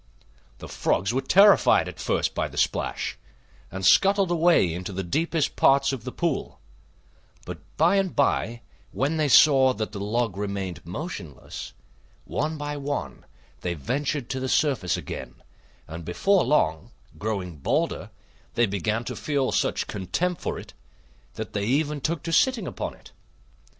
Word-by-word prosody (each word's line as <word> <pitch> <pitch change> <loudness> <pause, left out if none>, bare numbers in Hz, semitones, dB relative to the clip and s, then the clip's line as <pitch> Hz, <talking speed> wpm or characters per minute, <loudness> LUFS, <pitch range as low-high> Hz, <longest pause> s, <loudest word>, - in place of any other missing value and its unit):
The - - -9
Frogs 100 +5 0
were 130 - +1
terrified 195 +8 +5
at - - -8
first - - 0
by - - -1
the - - -12
splash, - - -1 0.5
and 95 +1 -5
scuttled 195 - +5
away 165 - +3
into 90 +3 -5
the 95 0 -3
deepest 155 - 0
parts 135 0 +4
of 120 -5 -6
the 125 - -4
pool; 170 -2 -2 0.9
but - - -7 0.2
by 170 +5 +4
and 195 -2 0
by, 120 -4 +1 0.3
when 145 +5 -1
they 155 -1 +2
saw 135 -2 +6
that 110 0 -3
the 100 - -6
log 105 0 -1
remained 100 -3 -4
motionless, 95 - -7 0.5
one 155 +2 -2
by 145 0 -4
one 140 - -4 0.3
they 90 -1 -3
ventured 135 - -2
to 130 - -2
the 130 0 -3
surface 130 - +1
again, - - -7 0.5
and 80 +1 -7
before 185 - +2
long, 80 - +1 0.3
growing 95 -5 -3
bolder, 70 - -1 0.5
they 120 - +4
began 105 +3 -1
to - - -5
feel 140 -3 -1
such - - 0
contempt 170 - -2
for - - -3
it - - -10 0.6
that - - -6
they 100 -1 -1
even 145 +4 0
took 160 +2 -2
to 165 - -3
sitting 260 - +3
upon - - -5
it. - - -17
130 Hz, 155 wpm, -25 LUFS, 100-155 Hz, 0.9 s, saw